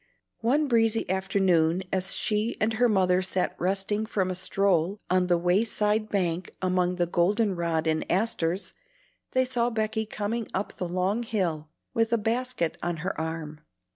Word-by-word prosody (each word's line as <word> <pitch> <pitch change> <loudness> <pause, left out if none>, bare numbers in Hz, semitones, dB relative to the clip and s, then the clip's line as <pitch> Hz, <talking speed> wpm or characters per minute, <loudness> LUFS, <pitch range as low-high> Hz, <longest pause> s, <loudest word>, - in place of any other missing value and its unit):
One 285 +6 +2
breezy 225 -2 +2
afternoon 190 -3 +2
as 190 0 +1
she 215 +1 0
and 220 +1 +1
her 240 +2 +3
mother 185 -3 +3
sat 185 0 -1
resting 195 +4 -1
from 190 -4 0
a - - -1
stroll 185 0 +1
on 185 0 +3
the 175 -1 +3
way 180 +5 +2
side 215 -1 0
bank 180 -3 -1
among 180 -1 +1
the 175 -1 +1
golden 195 +4 +1
rod 170 -2 0
and 155 0 0
asters, 185 -3 0 0.6
they 255 0 +3
saw 245 -2 +1
Becky 220 -1 -1
coming 215 +2 -3
up 195 - -3
the 180 - -3
long 185 +5 0
hill 175 -9 -2 0.2
with 225 0 +1
a 235 - +4
basket 230 -5 -1
on 175 -1 -2
her 195 - -1
arm. 160 -2 -5
195 Hz, 165 wpm, -27 LUFS, 175-220 Hz, 0.6 s, a